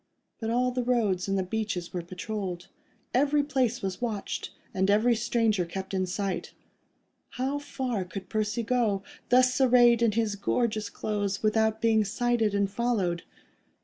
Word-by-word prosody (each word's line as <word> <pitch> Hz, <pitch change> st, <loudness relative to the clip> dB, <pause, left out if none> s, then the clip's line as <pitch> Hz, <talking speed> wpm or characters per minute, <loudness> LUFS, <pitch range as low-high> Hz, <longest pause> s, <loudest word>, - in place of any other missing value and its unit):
But 225 Hz, -, -3 dB
all 250 Hz, +2 st, +2 dB
the 250 Hz, 0 st, -1 dB
roads 220 Hz, -7 st, +1 dB
and 195 Hz, 0 st, 0 dB
the 190 Hz, -, +1 dB
beach 210 Hz, +1 st, -2 dB, 0.2 s
were 180 Hz, -, -2 dB
patrolled. 180 Hz, 0 st, -5 dB, 0.4 s
Every 285 Hz, +3 st, +3 dB
place 255 Hz, -6 st, 0 dB
was 190 Hz, +1 st, -3 dB
watched, 220 Hz, -5 st, -3 dB, 0.2 s
and 190 Hz, +1 st, +1 dB
every 220 Hz, +4 st, +4 dB
stranger 225 Hz, -4 st, +1 dB
kept 190 Hz, +3 st, -6 dB
in 185 Hz, -1 st, 0 dB
sight. 195 Hz, +1 st, -3 dB, 0.8 s
How 270 Hz, +3 st, -1 dB
far 255 Hz, -7 st, -3 dB
could 185 Hz, +1 st, -8 dB
Percy 215 Hz, +2 st, -1 dB
go, 220 Hz, -5 st, +1 dB, 0.3 s
thus 255 Hz, +1 st, +4 dB
arrayed 240 Hz, -2 st, +6 dB
in 230 Hz, -3 st, +3 dB
his 220 Hz, -2 st, 0 dB
gorgeous 215 Hz, 0 st, 0 dB
clothes, 205 Hz, -1 st, -2 dB
without 220 Hz, 0 st, +2 dB
being 220 Hz, -1 st, +4 dB
sighted 225 Hz, 0 st, 0 dB
and 200 Hz, 0 st, +2 dB
followed? 195 Hz, -5 st, 0 dB
220 Hz, 150 wpm, -28 LUFS, 195-240 Hz, 0.8 s, arrayed